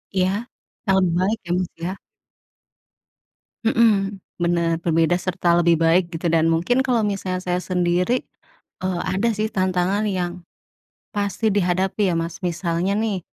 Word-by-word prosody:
Iya 185 -1 +3 0.6
hal 190 -1 +3 0.2
baik 200 +5 +1
ya 175 - -4
Mas 185 -1 -2
ya. 185 +3 -2 1.7
Mhm, 210 -4 +2 0.2
bener 170 -1 +1
berbeda 165 +1 +2
serta 180 -1 +1
lebih 170 -1 +3
baik 170 +2 +3
gitu 165 +1 -2
dan 165 0 +3
mungkin 180 +11 +2
kalau 245 -3 +1
misalnya 185 -2 -2
saya 180 0 -2
sendiri, 180 +6 +1 0.6
eee, 185 -2 -1
ada 205 +5 +1
sih 215 +1 +1
tantangan 185 +1 0
yang, 180 -2 -3 0.7
pasti 205 +2 0
dihadapi 190 0 +1
ya - - 0
Mas 165 +1 -4
misalnya 175 +2 -1
nih, 205 -6 -1
185 Hz, 135 wpm, -22 LUFS, 175-200 Hz, 1.7 s, Iya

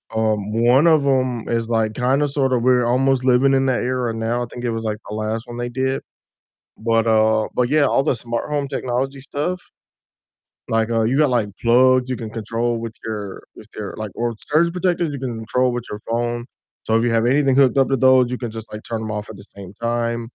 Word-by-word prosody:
um, 110 -1 +1
one 120 +6 +4
of 155 -4 +4
'em 130 -4 0
is, 115 -1 -1
like, 110 -2 +1
kinda 135 +4 +1
sort 135 -2 0
of 120 - +1
we're 125 -1 +3
almost 130 +1 +2
living 130 +2 +4
in 135 0 +2
that 130 - +1
era 125 -2 -1
now; 115 +2 -1
I - - -3
think 120 - -8
it 120 - 0
was, 115 0 -4
like, 105 -1 -2
the 105 - -5
last 110 +1 -3
one 120 0 -8
they 120 0 -3
did, 130 +2 -1 0.8
but, 115 0 +1
uh 110 -1 +3
but 125 -1 +1
yeah, 150 0 +4
all 135 - +2
the - - +2
smart 120 0 -3
home 145 -2 -1
technology 135 0 -2
stuff, 150 +6 -3 1.1
like, 115 0 +1
uh, 115 -1 +2
you 130 - +1
got, 150 -2 +4
like, 115 -4 +1
plugs 130 +2 +4
you 130 - -1
can 115 -2 -6
control 115 +2 -2
with 115 -1 -6
your 105 -3 -5
with 110 - -14
your, 105 -2 -5
like 110 -2 -5
or 120 - -1 0.2
surge 170 +3 +3
protectors 180 -2 0
you 140 - -5
can 125 -3 -4
control 125 +4 +1
with 120 -1 -4
your 105 - -6
phone, 120 +1 -1 0.4
so - - -17
if 115 - +1
you 120 - +1
have 115 - +1
anything 135 +1 +3
hooked 135 -1 +4
up 135 - +3
to 135 - +2
those, 130 -1 +4
you 125 - -2
can 120 -3 -5
just, 110 0 -9
like, 105 - -7
turn 115 -1 -3
'em 110 -1 -4
off 105 0 -5
at 105 - -11
the - - -13
same 95 -1 -10 0.2
time. 120 0 -1
120 Hz, 235 wpm, -20 LUFS, 115-130 Hz, 1.1 s, one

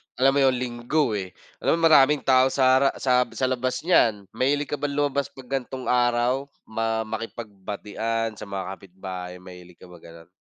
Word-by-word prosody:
alam 135 +2 +4
mo - - +4
yun 135 -1 +4
Linggo 125 +3 -1
eh, 95 -2 -6 0.3
alam - - +2
mo 165 - +5
maraming 145 0 +6
tao 130 0 +5
sa 130 -1 +4
ra 135 0 +4
sa 125 -1 +3
sa 130 -1 0
labas 130 0 -1
niyan. 110 - +2
Mahilig 145 +5 0
ka 145 - -2
ba 145 - -3
lumabas 140 -1 0
'pag 130 -1 -13
gan'tong 130 -1 -3
araw? 125 +2 +2 0.2
Ma 110 0 -1
makipagbatian 110 0 -4
sa 105 - -8
mga 100 -1 -5
kapitbahay? 90 -1 -8
Mahilig 90 -1 -13
ka 90 - -13
bang 90 -2 -15
ganun? 85 +1 -14
120 Hz, 180 wpm, -24 LUFS, 100-135 Hz, 0.3 s, maraming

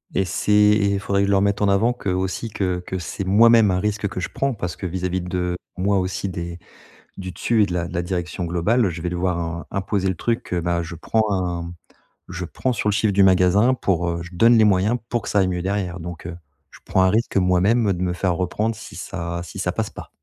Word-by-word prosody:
Et 95 - +2
c'est 95 +3 -2
et 105 -1 +4
faudrait 100 0 0
que - - +3
je 100 - +1
leur 100 0 +3
mette 100 +1 +1
en 100 - +3
avant 105 +5 +3
que, 110 -5 -5
heu, 90 - +1
aussi 95 +5 -2
que 90 -3 -1
que 95 - -4
c'est 90 +3 -5
moi-même 110 +1 +6
un 90 - +1
risque 105 0 -1
que 115 - -5
je - - -3
prends, 135 0 -1
parce 90 -7 -4
que - - -7
vis-à-vis 90 +1 -2
de 90 0 -2 0.2
moi 100 +2 +1
aussi, 95 +1 -2
des 85 -1 -6 0.6
du 95 -1 -6
dessus 110 +3 +1
et - - +3
de 90 - -5
la 85 -1 -1
de 90 - -10
la 85 - 0
direction 90 0 -3
globale, 95 +6 +1
je 85 -1 -6
vais 90 - -2
devoir 90 0 -1
im 85 0 -4
imposer 95 0 -1
le 95 - 0
truc 115 +7 -1
que 90 - -2
ben, 85 0 0
heu, - - -2
je 85 +1 -7
prends 110 +7 0
un 85 -2 -2 0.6
je 90 0 -5
prends 130 +8 -2
sur 105 -1 -1
le 105 - +2
chiffre 105 -1 +2
du 100 +1 +4
magasin 95 +6 +4
pour, 90 -7 0
heu 85 0 -2
je 90 - -10
donne 115 +6 +5
les 110 - +6
moyens 105 +3 +3
pour 120 -3 -1
que - - -7
ça 100 - +2
aille 95 - +2
mieux 90 -1 -2
derrière 95 -2 -2
donc, 85 0 -7
heu, 85 -1 -6 0.3
je - - -15
prends 95 - +2
un 95 - +4
risque 110 0 0
moi-même 95 +4 +3
de 90 - -4
me 90 -1 0
faire 90 0 0
reprendre 105 +5 -1
si 110 - -11
ça 85 -1 -5
si - - -10
ça - - -1
passe - - -2
pas. - - -10
95 Hz, 260 wpm, -22 LUFS, 90-105 Hz, 0.6 s, moi-même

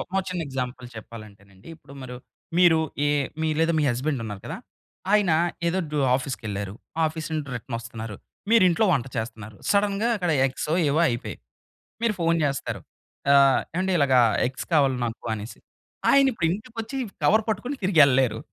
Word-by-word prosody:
ఒక 195 +2 -1
చిన్న 180 -1 -3
ఎగ్జాంపుల్ 125 -1 -4
చెప్పాలంటేనండి. 100 -3 -12
ఇప్పుడు 140 - -17
మరు 125 -1 -7 0.4
మీరు 175 -3 +6 0.3
ఏ - - +2 0.3
మీ 160 - +1
లేదా 165 +1 +3
మీ 150 - +2
హస్బండ్ 130 +2 -2
ఉన్నారు 105 -3 -6
కదా! - - -5 0.6
ఆయన 205 -5 +4 0.4
ఏదో 185 +3 0
డొ 150 - 0 0.2
ఆఫీస్‌ 130 -1 -4
కెళ్లారు. 100 -2 -4 0.3
ఆఫీస్ 160 0 -4
నుండి 155 -2 -2
రిటర్న్ 120 0 -5
వస్తున్నారు. 115 -3 -7 0.3
మీరు 230 -4 +6
ఇంట్లో 180 +6 +2
వంట 135 -3 0
చేస్త‌న్నారు. 110 -2 -5
సడెన్‌గా 205 +2 +2
అక్కడ 175 -4 -1 0.2
ఎగ్సో, 145 +4 -2 0.2
ఏవో 155 +4 +2
అయిపేయాయి. 120 -1 -4 0.6
మీరు 230 -2 +2
ఫోన్ 165 0 +2
చేస్తారు. 140 -2 -2 0.5
ఆహ్, 140 -1 +6
ఏవండీ 190 +1 0
ఇలాగ 140 -2 +3 0.3
ఎగ్స్ 130 0 -5
కావాలి 140 -4 +3
నాకు 115 0 -5
అనేసి. 105 +2 -8 0.5
ఆయన 275 0 +6
ఇప్పుడు 170 -8 -1
ఇంటికి 220 +6 -6
ఒచ్చి 270 +5 -6 0.3
కవర్ 220 +9 +4
పట్టుకొని 245 +7 -2
తిరిగి 185 -4 +3
ఎళ్ళలేరు. 125 -4 +2
140 Hz, 160 wpm, -25 LUFS, 120-180 Hz, 0.6 s, మీరు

